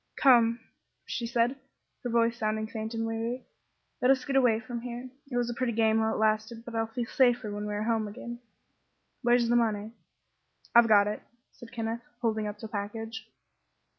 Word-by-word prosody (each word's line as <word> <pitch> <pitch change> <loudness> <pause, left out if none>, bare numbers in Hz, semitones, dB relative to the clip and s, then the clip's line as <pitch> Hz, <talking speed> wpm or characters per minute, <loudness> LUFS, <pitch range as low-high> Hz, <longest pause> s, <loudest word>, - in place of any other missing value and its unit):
"Come," 240 -4 +5 0.5
said 240 -1 0
she, 275 - -21 0.4
her 245 - -2
voice 230 0 +2
sounding 215 -1 -1
faint 220 +1 -5
and 225 0 -1
weary, 230 +3 -3 0.6
"let 250 - +4
us 265 -1 +4
get 275 - -2
away 245 -5 +4
from 235 +1 -6
here. 245 +1 -6 0.2
It 245 - -2
was 240 -1 +1
a 240 - -2
pretty 245 -1 -1
game, 220 0 +3
while 220 0 +2
it - - -2
lasted, 220 +2 0
but 240 - -8
I'll 225 0 0
feel 235 +2 -3
safer 245 -3 +2
when 205 0 -4
we 210 - -3
are 210 - -1
home 220 -1 0
again. 240 +3 -7 0.8
Where's 240 -1 +3
the 240 - +3
money?" 220 -2 +1 0.8
"I've 235 0 +7
got 205 -2 +6
it," 210 - -3 0.3
said 240 - -13
Kenneth, 230 0 -3 0.2
holding 220 -3 0
up 210 0 -5
the 220 - -7
package. 220 +2 -5
230 Hz, 190 wpm, -29 LUFS, 220-240 Hz, 0.8 s, I've